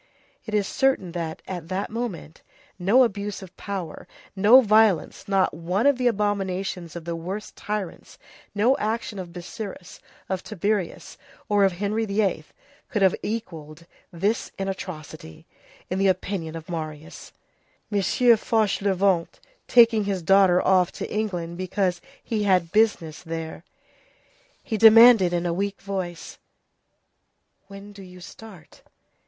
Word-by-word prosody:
It 215 - -2
is 205 -1 +2
certain, 265 -10 0
that, 165 -2 -5
at 175 -4 -6
that 190 +3 -3
moment, 215 -9 -6 0.4
no 210 +9 +5
abuse 205 -3 -3
of 185 -1 -13
power, 190 -6 -6 0.3
no 210 +6 +7
violence, 215 -6 +2
not 195 -1 +2
one 180 - -2
of 285 -3 +3
the 250 - +2
abominations 195 -5 -2
of 170 -1 -7
the 170 -1 -3
worst 185 +6 -6
tyrants, 205 -4 -6 0.4
no 230 +6 +3
action 215 -1 -3
of 180 -2 -7
Busiris, 185 +2 -8 0.3
of 190 -1 -3
Tiberius, 205 -2 -3 0.3
or 205 -1 +3
of 190 - +1
Henry 210 +4 -2
VIII., 200 -1 -1 0.4
could 210 -3 0
have 190 - +5
equalled 170 -8 -6 0.3
this 200 +6 -1
in 195 - -3
atrocity, 160 - -8 0.4
in 185 - -3
the 195 - +3
opinion 185 -3 -2
of 160 -1 -8
Marius; 155 -1 -7 0.6
M. 205 - +1
Fauchelevent 200 -5 +2 0.3
taking 230 -3 +5
his 195 -3 -2
daughter 190 0 +5
off 185 -2 +3
to - - -5
England 180 -5 -3
because 185 -1 -1 0.2
he 220 -3 -2
had 185 -5 +2
business 205 -8 +1
there. 165 -1 -6 1.0
He 220 - -3
demanded 225 -3 +8
in 175 0 -1
a 170 - 0
weak 200 +2 -3
voice:— 185 -4 -6 1.2
"And - - -44
when 200 +1 -11
do 200 - -12
you 180 -1 -13
start?" 185 -2 -13
195 Hz, 135 wpm, -24 LUFS, 175-210 Hz, 1.2 s, demanded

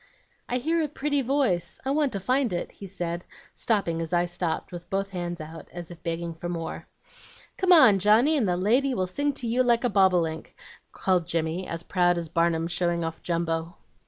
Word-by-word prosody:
"'I 250 - 0
hear 325 +6 0
a 310 - 0
pretty 285 0 -1
voice, 255 - 0
I 265 - 0
want 290 -2 +1
to 200 - -2
find 255 +5 +1
it,' 175 - -3
he 195 - -10
said, 175 -2 -4 0.3
stopping 185 -7 0
as 165 - -4
I 175 0 +3
stopped 175 -1 -3
with 175 -1 -9
both 195 0 -2
hands 175 -2 -4
out 160 +1 -9
as 175 -1 -8
if 170 -1 -11
begging 170 0 -3
for 170 +2 -6
more. 165 -2 -5 0.7
"'Come 375 -1 +3
on. 230 - +8
Johnny, 220 - +4
and 250 -9 +2
the 175 - +1
lady 250 +8 +2
will 185 - 0
sing 285 +11 -1
to 260 - -6
you 240 +3 +2
like 240 -1 +3
a 245 - +1
bobolink,' 180 -5 +2 0.4
called 180 -3 0
Jimmy, 165 +2 -2
as 165 0 -5
proud 175 -1 +2
as 170 -2 -4
Barnum 165 0 +1
showing 170 0 0
off 165 0 -5
Jumbo. 165 0 -2
180 Hz, 200 wpm, -26 LUFS, 170-240 Hz, 0.7 s, on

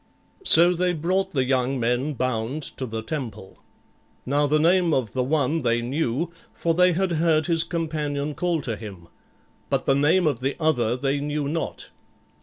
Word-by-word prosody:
So 175 - +6
they 180 +1 0
brought 185 +4 -1
the 135 -3 +2
young 130 0 0
men 125 +5 0
bound 130 +4 -2
to 130 - -4
the 110 -1 -5
temple. 110 -8 -6 0.7
Now 145 +3 +1
the 150 +2 +2
name 170 +1 +3
of 120 -6 -2
the 130 - 0
one 150 +3 0
they 120 -2 +1
knew, 145 +5 -2 0.2
for 165 - 0
they 180 +1 +4
had 190 +1 0
heard 160 -1 +2
his 165 -2 +2
companion 150 -4 -3
call 170 0 -1
to 115 -5 -3
him, 95 -6 -10 0.6
but - - 0
the - - +3
name 160 +6 +3
of 145 -6 +1
the 135 +2 -2
other 125 -7 +1
they 135 +2 -1
knew 145 0 -2
not. 160 +3 -4
145 Hz, 175 wpm, -24 LUFS, 125-165 Hz, 0.7 s, So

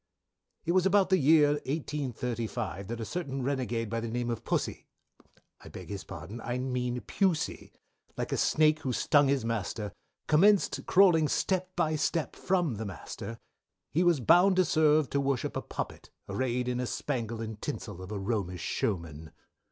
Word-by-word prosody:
"It 170 - +1
was 185 +1 +4
about 195 0 +3
the 190 - +5
year 150 0 +6 0.2
1835, 120 - -3
that 120 +1 -5
a 115 - -3
certain 135 - -4
renagade 120 -5 -2
of 115 - 0
the 115 - -3
name 120 +1 -2
of 115 0 -4
Pussy - - -2 0.7
I - - -12
beg - - -10
his 100 -2 -5
pardon, 95 +9 -8
I 120 +2 -3
mean 125 -1 -2
Pusey, 160 - -1 0.5
like - - -3
a - - 0
snake 155 0 +3
who 130 -5 -2
stung 145 +4 +4
his 135 -3 +1
master 105 -2 -3 0.3
commenced 195 +6 +3
crawling 175 -5 +5
step 185 +3 -1
by 155 -3 +1
step, 155 +1 -1
from 175 - 0
the 110 - -4
master; 115 +4 -7 0.5
he 165 - +2
was 175 -4 +4
bound 175 - +5
to 185 0 +4
serve 155 -3 +3
to 140 - +1
worship 135 -3 -1
a - - -1
puppet, - - -6 0.2
arrayed 125 -1 -1
in 125 0 -1
a 125 - -1
spangle 115 -6 -3
and 110 -2 -6
tinsel 105 -10 -5
of 95 +2 -8
a 105 - -3
romish 95 -4 -2
showman. 80 -6 -3
125 Hz, 170 wpm, -29 LUFS, 115-155 Hz, 0.7 s, year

